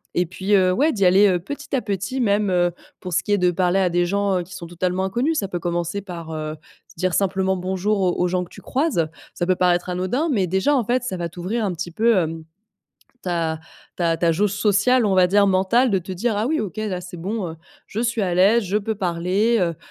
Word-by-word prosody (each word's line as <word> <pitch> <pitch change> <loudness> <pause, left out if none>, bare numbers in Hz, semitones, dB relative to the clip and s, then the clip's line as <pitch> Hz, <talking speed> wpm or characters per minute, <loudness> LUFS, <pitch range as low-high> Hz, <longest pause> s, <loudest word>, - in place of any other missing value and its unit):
Et 175 0 +1
puis, 190 +3 -2
heu, 185 -2 +5
ouais 285 +12 +2
d'y 200 - 0
aller, 190 +3 +6
heu, 180 -2 +2
petit 280 +9 -5
à 255 - +1
petit, 205 +5 -3
même, 205 -3 +2
heu, 175 -1 +2 0.3
pour 180 -1 -6
ce 175 -1 +1
qui 205 - -4
est 205 - +2
de 180 0 +3
parler 180 +1 +1
à 185 -2 +2
des 175 0 +1
gens, 200 0 0
heu, 175 - -3
qui 185 - -13
sont 175 -2 -8
totalement 180 +2 -2
inconnus, 255 +12 0
ça 195 - -2
peut 180 -2 -4
commencer 175 +2 -2
par, 175 -4 -8
heu, 155 0 -4 0.3
se - - -19
dire 185 +1 0
simplement 190 -1 +1
«bonjour» 190 +3 -1
aux 180 -2 +2
aux 180 - +3
gens 180 0 0
que 175 - -12
tu - - -13
croises, 260 - 0 0.3
ça 175 - -2
peut 185 - +3
paraître 180 0 +1
anodin 185 - -1
mais 200 -7 +2
déjà, 190 - +2
en 255 - +2
fait, 245 +3 +1
ça 235 -7 -3
va 170 -1 -2
t'ouvrir 185 +7 -3
un 190 - -1
petit 175 +1 -5
peu, 225 +6 +3
hem, 165 -2 -1 0.8
ta 165 -3 -1 0.4
ta 165 -2 +1
ta 165 0 +2
jauge 200 +4 +1
sociale, 210 +5 +3
on 200 - +2
va 185 -1 +5
dire, 200 +2 +4
mentale, 200 +6 +3
de 195 - +2
te 185 +2 -8
dire: 215 +5 -1
«Ah 215 - 0
oui 315 +3 0
OK 210 -1 -5
là 205 -4 -3
c'est 180 0 -9
bon, 190 +1 -3
heu, 160 - -8 0.3
je 215 - -5
suis 230 -1 0
à 180 -2 -1
l'aise, 200 +6 +4
je 195 +2 0
peux 215 +1 -3
parler 190 +5 +1
heu», 170 -2 0
190 Hz, 250 wpm, -22 LUFS, 175-210 Hz, 0.8 s, aller